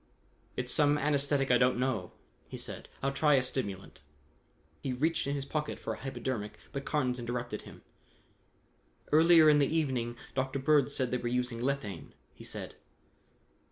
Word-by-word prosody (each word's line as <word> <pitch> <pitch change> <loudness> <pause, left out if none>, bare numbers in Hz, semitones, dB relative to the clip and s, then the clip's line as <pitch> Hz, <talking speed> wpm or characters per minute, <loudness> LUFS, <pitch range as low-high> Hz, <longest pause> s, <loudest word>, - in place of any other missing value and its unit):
"It's 125 -1 0
some 145 -1 +4
anesthetic 140 -2 +1
I 125 - +5
don't 125 0 +3
know," 125 -8 -1 0.3
he - - -7
said. - - -4
"I'll 135 - +1
try 150 +1 +3
a 130 - +3
stimulant." 100 -7 -4 0.8
He 130 - -2
reached 155 +4 0
in 140 - 0
his 140 -1 -3
pocket 150 +1 -3
for - - -4
a - - -8
hypodermic, 120 -5 -4
but 140 -1 -5
Carnes 130 -5 0
interrupted 120 -2 -4
him. - - -15 1.3
"Earlier 160 +1 +7
in 150 -1 +6
the 140 - +4
evening 125 -6 -1 0.2
Dr. 130 +1 -1
Bird 140 0 +3
said 130 -3 -1
they 125 - +1
were 120 - -4
using 125 -1 -1
lethane," 125 - -3 0.2
he - - -13
said. - - -7
130 Hz, 160 wpm, -31 LUFS, 125-145 Hz, 1.3 s, Earlier